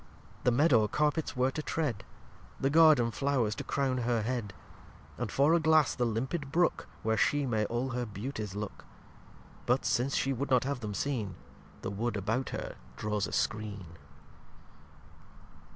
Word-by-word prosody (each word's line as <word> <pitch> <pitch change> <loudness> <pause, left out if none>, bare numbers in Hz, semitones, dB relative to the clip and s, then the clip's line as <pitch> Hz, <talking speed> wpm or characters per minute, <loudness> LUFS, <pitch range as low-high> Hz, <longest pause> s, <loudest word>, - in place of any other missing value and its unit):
The 125 - +5
Meadow 120 -4 +4
Carpets 150 +3 0
where 130 +1 +2
to 155 - -3
tread; 150 -9 -2 0.6
The 135 - +1
Garden 155 -7 +6
Flow'rs 130 -4 0
to - - -4
Crown 135 -2 0
Her 120 -2 0
Head; 115 -3 -2 0.7
And - - -2
for 145 +4 +4
a 170 - +5
Glass 160 -2 +4
the 125 - 0
limpid 135 +6 -2
Brook, 175 +2 +1 0.2
Where 110 0 +2
She 145 +6 +2
may 110 -4 0
all 120 +4 -2
her 125 -1 -2
Beautyes 105 -1 -5
look; 105 -1 -6 0.8
But, - - +2
since 130 +3 +1
She 135 - +1
would 140 +3 -3
not 125 -2 +4
have 140 -1 -2
them 105 -4 -5
seen, 110 -10 -2 0.5
The - - -3
Wood 110 +2 -2
about 115 +7 -1
her - - -5 0.2
draws 105 -2 -1
a - - -8
Skreen. 105 -3 -2
125 Hz, 160 wpm, -31 LUFS, 110-140 Hz, 0.8 s, Garden